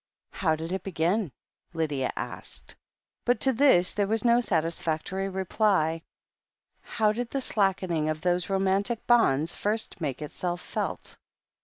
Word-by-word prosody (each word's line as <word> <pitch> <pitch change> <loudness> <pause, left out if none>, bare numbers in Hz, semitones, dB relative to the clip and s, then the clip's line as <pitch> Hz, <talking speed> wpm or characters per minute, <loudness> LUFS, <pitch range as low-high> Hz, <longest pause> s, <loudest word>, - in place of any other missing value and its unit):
"How 160 -5 +1
did 165 +2 -6
it 190 - -2
begin 180 0 0 0.2
?" - - -45
Lydia 150 -5 -1
asked. - - -5 0.5
But 245 +1 +2
to 265 - +4
this 235 -9 +4
there 205 -1 0
was 225 +3 0
no 235 +1 +5
satisfactory 170 0 -1
reply. 190 -4 +1 0.8
How 215 -1 +1
did 235 +2 -3
the 275 - -2
slackening 190 -9 +1
cf 155 0 -2
those 180 0 0
romantic 195 +4 0
bonds 165 - +3
first 215 -2 -2
make 145 -1 -3
itself 175 +3 -3
felt? - - -4
190 Hz, 140 wpm, -27 LUFS, 160-215 Hz, 0.8 s, no